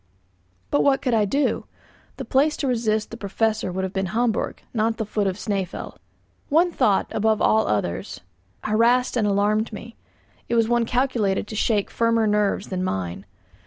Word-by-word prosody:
But 145 - +3
what 270 -1 +3
could 250 - +1
I 215 -2 +3
do? 275 +8 0 0.5
The - - -5
place 295 +3 +2
to 280 - -2
resist 220 -3 0
the 230 - -7
Professor 215 -1 -1
would 190 +1 -3
have 190 0 -3
been 190 -1 -1
Hamburg, 225 +4 -1
not 225 0 0
the 220 - -2
foot 205 -1 -1
of 190 - -1
Snæfell. 195 -4 -4 0.5
One 335 +4 +3
thought, 205 - +2
above 220 0 +1
all 220 0 +3
others, 90 -4 -2 0.4
harassed 235 +4 +2
and 220 -4 +1
alarmed 210 +3 +1
me; 225 +2 -9 0.5
it 235 - +1
was 230 -1 +3
one 240 0 +2
calculated 235 -6 0
to 215 - -6
shake 210 -1 0
firmer 230 -1 +2
nerves 210 -1 0
than 185 -1 -2
mine. 95 - -3
220 Hz, 170 wpm, -23 LUFS, 200-235 Hz, 0.5 s, But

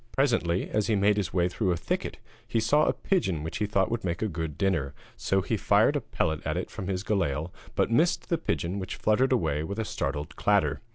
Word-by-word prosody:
Presently, 115 -10 +1
as 105 -1 0
he 110 - +2
made 100 +1 +3
his 100 -4 -1
way 90 -1 +2
through 95 +1 0
a 85 - 0
thicket, - - -3 0.3
he 115 - 0
saw 150 +8 +3
a - - +2
pigeon 95 - 0
which 80 - -4
he 105 - 0
thought 100 -2 +1
would 115 -1 -2
make 85 +2 -2
a - - +1
good 80 -5 -4
dinner, 80 -8 0 0.2
so 95 0 +1
he - - 0
fired - - +3
a - - 0
pellet 80 -2 -1
at - - -1
it - - -4
from 95 - -6
his 95 -1 -2
galail, 90 -6 -1 0.2
but - - +1
missed 165 +9 +2
the 170 - +1
pigeon 95 - -2
which 95 -1 -5
fluttered 125 +5 +2
away 75 - +1
with 100 +6 -5
a 110 - -1
startled 75 -2 -3
clatter. 100 -1 +2
95 Hz, 230 wpm, -28 LUFS, 85-110 Hz, 0.3 s, made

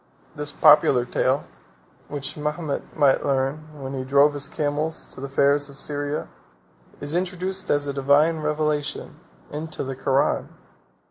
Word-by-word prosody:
This 150 0 -4
popular 130 -4 +5
tale, 130 +2 +1 0.6
which 140 -2 -5
Mahomet 150 0 -4
might 140 -3 +4
learn 135 +3 -1
when 135 0 -6
he 130 -1 -3
drove 140 +3 +4
his 140 -1 -3
camels 155 +1 -1
to - - -8
the 140 - -5
fairs 140 +1 +2
of 140 - -12
Syria, 145 0 -2 0.7
is 145 +1 -5
introduced 185 +1 -2
as 145 0 +2
a 140 - -2
divine 140 +4 +3
revelation, 150 -1 -2 0.3
into 155 +1 -5
the 135 0 -4
Koran. 135 +1 +1
145 Hz, 140 wpm, -24 LUFS, 140-150 Hz, 0.7 s, popular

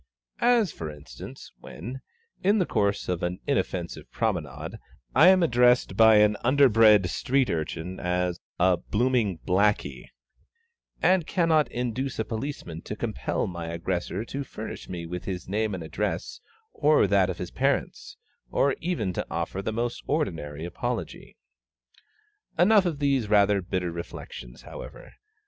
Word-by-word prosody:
'"] - - -46 0.2
As, 205 -8 0
for 80 - -6
instance, 75 -1 -11
when, 130 +3 -8 0.4
in 200 +3 +3
the 185 - +2
course 100 -6 0
of 90 -2 -1
an 90 +2 -2
inoffensive 90 -11 -2
promenade, - - -3 0.3
I 165 - +7
am 185 -1 +6
addressed 125 -6 +3
by 110 +1 +7
an 105 0 +5
underbred 115 -7 +5
street 130 +7 +1
urchin 85 +3 -4
as 90 0 -1 0.2
a 90 0 +4
"blooming 110 0 0
blacky," 100 +3 +1 1.0
and 180 -3 +3
cannot 165 -4 +2
induce 125 +2 -3
a 110 - -1
policeman 110 - -5
to 105 - -6
compel 110 0 -2
my 85 -2 -5
aggressor 90 +4 -3
to 140 +3 -4
furnish 110 -4 -8
me 85 -2 -5
with 90 +1 -6
his 90 -2 -5
name 105 +1 -1
and 90 - -6
address 80 - -3 0.3
or 150 -5 +4
that 100 -1 +3
of - - -3
his - - -6
parents, - - -1 0.3
or 140 -1 +2
even 160 - -1
to - - -3
offer 85 +3 -3
the 105 - -2
most 120 +2 -2
ordinary 80 - -2
apology. 85 - -5 1.2
Enough 190 +2 +5
of 160 -4 -2
these 135 -6 +1
rather 100 -1 +4
bitter 90 -1 -2
reflections, 65 -7 -8
however. - - -10
105 Hz, 145 wpm, -26 LUFS, 90-135 Hz, 1.2 s, I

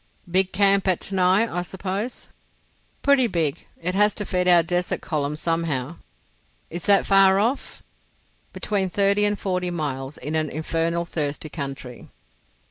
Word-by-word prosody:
"Big 185 +2 +1
camp 200 -1 +3
at 185 -2 +2
Tanai, 190 +2 +2
I 175 -5 -3
suppose?" 195 +6 -5 0.7
"Pretty 280 -3 +4
big. 165 -8 -2
It 180 +2 -2
has 210 +2 +3
to 205 - -4
feed 180 -1 -1
our 175 -2 +6
desert 180 +1 -1
column 150 -3 -2
somehow." 165 -2 -2 0.7
"Is 170 +1 -6
that 200 -1 +5
far 195 -1 +5
off?" 235 +7 -2 0.7
"Between 195 -3 -1
thirty 200 +2 +3
and 205 0 0
forty 180 -2 -2
miles—in 145 -3 -4
an 155 -1 0
infernal 165 +3 -1
thirsty 155 -2 -3
country." 135 -5 -7
180 Hz, 135 wpm, -23 LUFS, 155-195 Hz, 0.7 s, our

